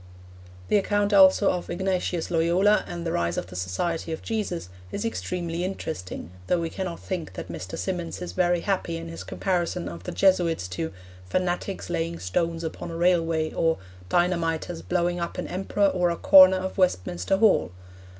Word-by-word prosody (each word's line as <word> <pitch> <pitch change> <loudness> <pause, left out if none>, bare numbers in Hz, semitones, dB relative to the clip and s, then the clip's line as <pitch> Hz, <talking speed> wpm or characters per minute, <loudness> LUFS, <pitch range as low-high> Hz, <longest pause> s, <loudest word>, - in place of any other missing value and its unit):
The - - +5
account 205 +1 +1
also 195 0 +6
of 180 - -4
Ignatius 180 -2 -1
Loyola 175 +5 +3
and 170 -1 -5
the 165 - -1
rise 85 - 0
of - - -2
the 90 0 -12
Society 160 - -2
of 160 - -5
Jesus 200 - -3 0.2
is 205 - -3
extremely 175 -6 -3
interesting, 155 - -5 0.2
though 180 - +2
we 165 -1 -3
cannot 185 -3 -4
think 175 - -4
that 95 - -7
Mr. 90 +2 -6
Symonds 175 -3 -3
is 180 - -5
very 175 -1 +2
happy 185 -4 -1
in 165 0 -7
his 165 - -7
comparison 180 -2 -1
of 85 0 -7
the - - -6
Jesuits 175 - +2
to 160 - -3 0.4
'fanatics 185 - -2
laying 170 0 -1
stones 165 - -1
upon 160 - -5
a 165 - -5
railway' 165 -2 +2
or 165 0 +1 0.3
'dynamiters 170 -1 0
blowing 175 0 0
up 170 - -4
an - - -3
emperor 195 +2 +1
or 180 -2 +1
a 170 - 0
corner 190 -1 +8
of 190 +1 -4
Westminster 90 - +1
Hall.' 215 - +4
175 Hz, 170 wpm, -26 LUFS, 165-185 Hz, 0.4 s, corner